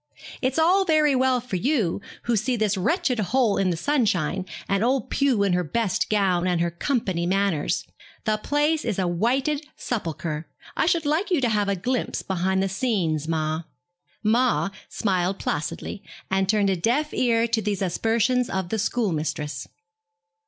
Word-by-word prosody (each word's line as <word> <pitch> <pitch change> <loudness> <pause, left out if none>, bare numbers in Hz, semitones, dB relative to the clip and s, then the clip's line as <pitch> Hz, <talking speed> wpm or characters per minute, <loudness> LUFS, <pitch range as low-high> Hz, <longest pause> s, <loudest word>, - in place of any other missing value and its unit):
'It's 260 +2 0
all 355 +5 +4
very 310 -5 +3
well 260 -1 +3
for 235 -6 -4
you, 215 - 0 0.2
who 235 - +1
see 240 +5 +1
this 215 -3 +1
wretched 250 - 0
hole 220 +1 +2
in 195 -1 +2
the 170 - -1
sunshine, 190 - 0 0.2
and 195 +1 +1
old 260 +2 0
Pew 265 -7 +2
in 195 -2 +2
her 180 0 +2
best 195 +3 -1
gown 185 -4 +2
and 180 -2 +1
her 170 0 +1
company 185 - -1
manners. 195 -5 0 0.4
The 215 -1 +2
place 295 +6 +1
is 225 -5 -2
a 190 - +1
whited 260 - 0
sepulchre. 165 -7 -4 0.3
I - - +1
should 335 -3 +2
like 320 +8 +1
you 355 -5 +2
to 245 - +2
have 205 -2 +1
a 200 - +1
glimpse 245 +7 -2
behind 190 +1 0
the - - +1
scenes, 185 - -1
ma.' 155 0 -1 0.6
'Ma' 230 -1 +2 0.2
smiled 190 -2 0
placidly, 165 +6 -3 0.3
and 190 0 +1
turned 205 -2 +3
a - - +1
deaf 245 - 0
ear 230 -2 +2
to 230 -1 +1
these 200 -1 -1
aspersions 230 +6 +1
of 190 -2 -2
the 220 - -1
schoolmistress. 155 - -2
210 Hz, 165 wpm, -24 LUFS, 180-255 Hz, 0.6 s, all